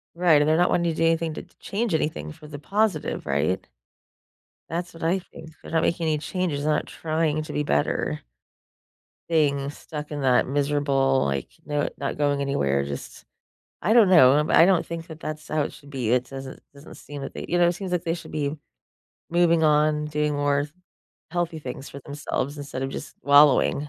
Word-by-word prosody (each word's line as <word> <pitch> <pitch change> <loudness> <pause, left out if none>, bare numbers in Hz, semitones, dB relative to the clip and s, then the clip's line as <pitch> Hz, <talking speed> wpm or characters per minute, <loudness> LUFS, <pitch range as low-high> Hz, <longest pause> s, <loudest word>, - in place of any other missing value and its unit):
Right, 170 -4 +4
and 150 - +1
they're 155 - +4
not 175 +1 +3
wanting 170 -1 +2
to - - -7
do 165 - +1
anything 165 -1 +1
to - - -6
t - - -22
change 210 -1 -2
anything 115 - -2
for 150 - -14
the 145 -1 -7
positive, 200 0 -1
right? 70 +7 0 1.0
That's 175 +2 -4
what 165 - -12
I 170 +4 +2
think. 160 -3 -12
They're - - -10
not 160 -1 +2
making 170 -1 0
any 155 -1 +1
changes, 160 -3 -2
they're 155 0 +2
not - - -1
trying 155 -1 -1
to 155 - -8
be 150 - +1
better. 75 - 0 1.1
Being 140 -4 +2
stuck 150 0 -8
in 145 -2 -4
that 130 -2 +3
miserable, 140 -1 +1
like, 70 -2 -2
no 145 0 -1
not 140 0 -3
going 145 -1 +1
anywhere. 70 - +1
Just 70 -1 -7 0.6
I 215 - +1
don't 225 -4 +6
know, 130 -9 +7
I'm 150 +2 +2
I 165 - +7
don't 185 -3 +3
think 165 0 -6
that 160 -1 -10
that's 155 0 -6
how 155 -1 0
it - - -4
should 145 - -15
be. 130 -6 -2
It 125 +1 +2
doesn't 135 -1 -8
doesn't 140 +2 -13
seem 145 -1 -9
that 135 - -6
they - - -7
you 175 - +1
know, 175 0 +5
seems 180 +1 -5
like 175 -2 0
they 165 -2 -1
should 170 - -10
be 150 0 -2 0.7
moving 170 -1 +3
on, 150 0 +3
doing 150 0 0
more 145 0 +1 0.6
healthy 170 -1 -2
things 135 -1 -7
for 140 - -9
themselves 145 -1 -3
instead 140 -2 -5
of 135 - -2
just - - -7
wallowing, 145 0 +5
150 Hz, 200 wpm, -25 LUFS, 140-165 Hz, 1.1 s, know